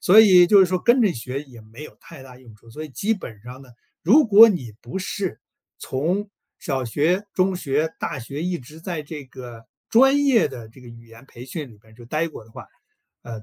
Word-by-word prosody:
所 205 +4 +7
以 185 -5 +7
就 200 +1 +6
是 190 - +5
说 185 0 -1
跟 240 +6 +3
着 200 -5 +2
学 130 +3 -6
也 125 -5 -15
没 110 +7 -13
有 - - -12
太 160 -6 -13
大 125 -1 -14
用 120 -4 -17
处。 115 +2 -20
所 155 +7 -8
以 - - -9
基 200 - -1
本 110 - -10
上 125 +2 -11
呢， 130 - -17 0.3
如 265 - +5
果 220 +2 +8
你 130 - -4
不 125 +11 -6
是 190 0 -4 0.4
从 180 +10 -2 0.3
小 135 -4 -3
学、 165 - 0
中 185 0 +1
学、 155 -1 -2
大 150 -5 -4
学 140 +6 -7
一 180 0 -2
直 150 +6 -14
在 170 -3 -5
这 150 -1 -9
个 120 -3 -12 0.2
专 270 +4 +4
业 255 -6 +3
的 120 -4 -10
这 125 +3 -18
个 125 - -14
语 115 0 -14
言 115 +3 -16
培 120 -2 -12
训 140 0 -7
里 110 - -17
边 110 +1 -22
就 120 0 -15
呆 155 +6 -1
过 115 - -12
的 115 - -21
话， - - -11 0.6
呃， 115 -2 -9
150 Hz, 245 characters per minute, -22 LUFS, 120-185 Hz, 0.6 s, 果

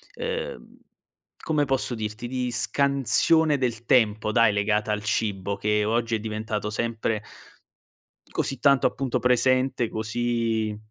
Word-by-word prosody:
ehm, 485 0 -5 0.7
come 150 -2 +1
posso 135 -2 -1
dirti, 110 +2 -5
di 125 -1 -2
scansione 140 +5 +2
del 120 -3 -2
tempo 110 -3 +2
dai, 115 -2 +4
legata 105 +1 0
al 105 0 -3
cibo, 100 -2 -1
che 105 +1 +1
oggi 115 +1 0
è - - -2
diventato 110 -1 -3
sempre 110 -1 -2 1.1
così 135 - -2
tanto 140 -1 +4
appunto 135 -3 -1
presente, 125 0 +2
così 110 -1 -1
115 Hz, 120 wpm, -25 LUFS, 110-130 Hz, 1.1 s, dai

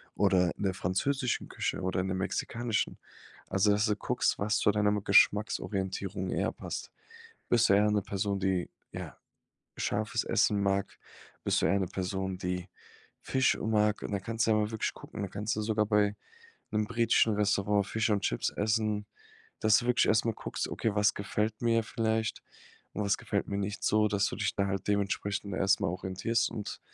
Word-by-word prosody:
oder 90 -3 +3
in - - -5
der 95 -1 +1
französischen 125 +9 -1
Küche - - -2
oder 95 0 -1
in 95 - -3
der 95 - -1
mexikanischen. 115 +4 -2 0.5
Also 95 +2 +2
dass 105 +1 +2
du 105 - +1
guckst, 125 +4 0
was 105 +1 +1
zu - - +4
deiner 105 0 +2
m 105 -1 0
Geschmacksorientierung 95 -2 +2
eher - - 0
passt. - - -6 0.6
Bist 120 -1 +4
du - - +7
eher 105 +1 +4
'ne 105 -1 +1
Person, 100 +1 -2
die, 95 -2 0 0.2
ja, - - -7 0.6
scharfes 110 +2 -1
Essen 105 -2 +2
mag? 100 0 0 0.5
Bist - - +2
du - - +3
eher 100 - +2
'ne 95 - -1
Person, 95 0 -3
die 90 -1 -3 0.5
Fisch, 130 -1 +2
äh, - - -8
mag? 105 -1 +1
Und - - -5
da 100 - 0
kannst 115 +4 -1
du - - +4
ja 110 - +4
mal 105 0 +1
wirklich 110 -2 -2
gucken - - -9
da 100 - -4
kannst 105 +3 -2
du - - 0
sogar 105 0 +1
bei 105 -1 +2 0.6
'nem 105 0 +1
britischen 115 0 +3
Restaurant 100 0 +2
Fisch 110 +1 0
und 100 -1 +2
Chips - - 0
essen 105 0 0 0.6
dass 110 -1 +5
du 120 - -3
wirklich 125 -1 +3
erst 110 0 +3
mal 115 -1 0
guckst, - - -4
okay, 110 -3 -1
was 105 0 +3
gefällt 105 +2 -2
mir 115 -1 +3
vielleicht 110 0 -1 0.5
und 105 - -2
was 100 - +1
gefällt - - -2
mir 100 - -2
nicht 100 +1 -3
so 105 0 +3
dass 100 -1 +1
du - - -5
dich 105 -1 -1
da 100 - +1
halt 95 0 -3
dementsprechend 100 0 -1
erst 95 0 +2
mal - - +1
orientierst 95 +6 -1
und 105 -3 -6
105 Hz, 190 wpm, -30 LUFS, 95-110 Hz, 0.6 s, du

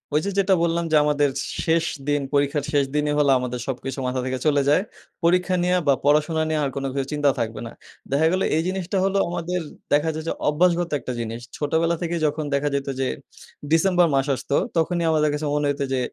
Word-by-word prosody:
ওই - - +5
যে, 200 - 0
যেটা 195 0 +3
বললাম 170 0 0
যে - - +4
আমাদের 145 -1 +2 0.3
শেষ 165 0 +2 0.2
দিন, 145 0 +1
পরীক্ষার 140 0 +1
শেষ 140 -1 +3
দিনই 150 0 +1
হল 145 - +3
আমাদের 125 -1 -4
সবকিছু 135 +1 -4
মাথা 130 +1 -1
থেকে 130 0 -2
চলে 145 -2 +3
যায়। 150 +6 +4 0.4
পরীক্ষা 180 +2 +3
নিয়ে 180 +1 +2
বা 140 - +6
পড়াশোনা 155 +2 +3
নিয়ে 155 - 0
আর 140 - 0
কোনো 135 0 -2
কিছু 135 -1 -1
চিন্তাও 145 -2 +2
থাকবে 115 -1 -3
না। - - -9 0.4
দেখা 150 +3 +3
গেলো 185 +1 +1
এই 160 - +2
জিনিসটা 190 0 -2
হলো 195 0 +1
আমাদের 175 +1 -2 0.3
দেখা 150 +2 +3
যায় 155 0 -5
যে - - 0 0.2
অভ্যাসগত 175 +2 +2
একটা 125 - -5
জিনিস। 115 0 -4 0.2
ছোটবেলা 160 +3 +1
থেকে 170 0 -2
যখন 150 +1 -1
দেখা 140 +1 +1
যেত 140 0 -2
যে, 130 - +1 0.6
ডিসেম্বর 175 +1 +4
মাস 135 +1 +1
আসতো 140 - -3 0.2
তখনই 170 +1 +1
আমাদের 150 -1 +2
কাছে 150 +1 -2
মনে 150 0 +1
হইত 145 0 -2
যে, 130 - +1
150 Hz, 210 wpm, -23 LUFS, 140-170 Hz, 0.6 s, বা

